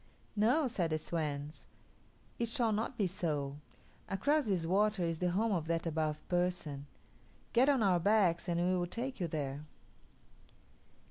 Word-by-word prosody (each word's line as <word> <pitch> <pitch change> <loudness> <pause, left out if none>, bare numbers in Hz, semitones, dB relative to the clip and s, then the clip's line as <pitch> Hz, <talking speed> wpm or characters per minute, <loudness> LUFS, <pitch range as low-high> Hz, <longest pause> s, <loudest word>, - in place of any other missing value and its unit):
"No," 240 +9 +3
said 185 -9 0
the 155 - +1
swans; 150 -2 -3 0.8
"it 235 - +1
shall 230 -1 +1
not 225 +4 -2
be 205 - +2
so. 150 -6 -2 0.5
Across 285 +8 +1
this 185 -5 +1
water 200 +2 +2
is 165 -1 -1
the 180 - +1
home 215 +6 +1
of 165 -5 -1
that 165 0 0
Above 155 -2 -2
Person. 175 -6 -1 0.7
Get 255 +4 +5
on 270 -5 +3
our 185 -3 +4
backs, 180 -3 +3
and 170 0 +1
we 180 +1 +2
will 175 -1 0
take 245 +7 -4
you 175 - 0
there." 145 -2 -3
180 Hz, 155 wpm, -34 LUFS, 160-215 Hz, 0.8 s, Get